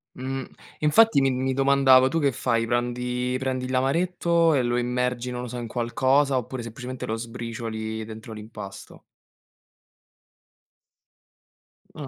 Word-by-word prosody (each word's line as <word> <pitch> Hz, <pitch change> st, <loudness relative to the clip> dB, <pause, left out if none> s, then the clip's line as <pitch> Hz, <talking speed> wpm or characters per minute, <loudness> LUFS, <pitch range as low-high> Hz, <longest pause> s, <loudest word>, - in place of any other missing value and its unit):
Mh. 135 Hz, +1 st, -4 dB, 0.4 s
E -, -, -3 dB
infatti 220 Hz, +1 st, +5 dB
mi 135 Hz, -1 st, +3 dB
mi 130 Hz, +1 st, -1 dB
domandavo, 135 Hz, -1 st, +5 dB
tu 165 Hz, +5 st, 0 dB
che 140 Hz, -3 st, +2 dB
fai 115 Hz, -1 st, 0 dB
prandi 125 Hz, +1 st, -1 dB
prendi 130 Hz, -1 st, -2 dB
l'amaretto 165 Hz, +5 st, +2 dB
e 140 Hz, -, +3 dB
lo 120 Hz, 0 st, 0 dB
immergi, 125 Hz, 0 st, -1 dB
non 125 Hz, -, -4 dB
lo 125 Hz, -, -5 dB
so, 125 Hz, +1 st, -6 dB
in 120 Hz, -, -4 dB
qualcosa 130 Hz, +4 st, +1 dB
oppure 125 Hz, +1 st, -4 dB
semplicemente 125 Hz, +2 st, -7 dB
lo 110 Hz, -, -1 dB
sbricioli 115 Hz, -1 st, -5 dB
dentro 110 Hz, +1 st, -9 dB
l'impasto? 105 Hz, -2 st, -10 dB, 3.0 s
Ah. 140 Hz, -, -5 dB
125 Hz, 135 wpm, -25 LUFS, 120-135 Hz, 3.0 s, infatti